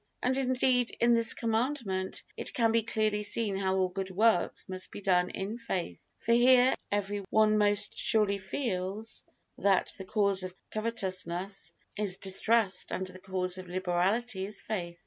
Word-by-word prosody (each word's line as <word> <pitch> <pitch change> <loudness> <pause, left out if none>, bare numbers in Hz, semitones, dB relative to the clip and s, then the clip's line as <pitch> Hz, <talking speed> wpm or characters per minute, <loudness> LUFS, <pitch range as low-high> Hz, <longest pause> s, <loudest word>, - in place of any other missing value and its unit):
And, 255 +1 +1
indeed, 255 -2 +1
in 235 0 +4
this 230 -1 +4
Commandment 225 -5 -2
it - - -5
can 230 -3 +3
be 230 0 +3
clearly 215 -2 -1
seen 210 0 +2
how 190 -1 0
all 190 -1 +2
good 190 +1 -5
works 210 0 +1
must 185 -1 -1
be - - -9
done 180 -3 +2
in 205 +5 -5
faith; 175 - -4
for 230 - 0
here 250 +1 +5 0.2
every 205 0 -1
one 215 -1 +3
most 205 0 +2
surely 210 -3 +2
feels 195 0 -3 0.3
that 195 -2 +2
the 190 - -7
cause 200 -1 +3
of 185 0 -6 0.2
covetousness 190 -4 -2 0.3
is 195 -3 +2
distrust 200 +1 +2
and 190 - -3
the 185 0 -5
cause 185 -1 -1
of 185 - -9
liberality 190 +4 -1
is 210 -1 -4
faith. 175 -5 -5
205 Hz, 160 wpm, -29 LUFS, 185-230 Hz, 0.3 s, here